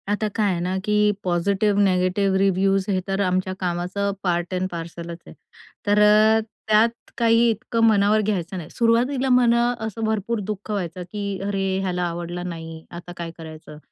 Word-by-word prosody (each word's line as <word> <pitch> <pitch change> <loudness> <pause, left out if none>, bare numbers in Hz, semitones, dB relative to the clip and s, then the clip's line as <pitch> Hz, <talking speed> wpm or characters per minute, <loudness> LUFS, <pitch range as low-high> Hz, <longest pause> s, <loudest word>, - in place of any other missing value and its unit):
आता 210 +1 0
काय 210 -3 +2
आहे 175 - -1
ना 180 +2 -1
की 210 0 +3
पॉझिटिव्ह 200 +3 +1
निगेटिव्ह 190 +1 +2
रिव्ह्यूज 195 0 +2
हे 190 -2 +1
तर 195 0 -1
आमच्या 185 0 0
कामाचं 180 +3 -2
पार्ट 175 -1 -1
ॲड 185 0 -1
पार्सलच 170 0 -7
आहे. - - -11 0.5
तर 205 +1 +4 0.7
त्यात 220 +2 +5 0.3
काही 230 0 +4
इतकं 230 +1 -1
मनावर 215 -1 +4
घ्यायचं 190 -3 -2
नाही, 170 -2 -7
सुरुवातीला 250 +3 +1
मला 240 -1 +4 0.2
असं 220 +1 -5
भरपूर 220 +1 -1
दुःख 210 +1 -5
व्हायचं, 180 -3 -3
की 200 -2 -4
अरे 195 -1 -1 0.2
ह्याला 180 -2 -1
आवडला 175 0 -4
नाही. 165 -2 -7
आता 175 0 -9
काय 170 -1 -5
करायचं? 155 -2 -10
195 Hz, 160 wpm, -23 LUFS, 175-215 Hz, 0.7 s, त्यात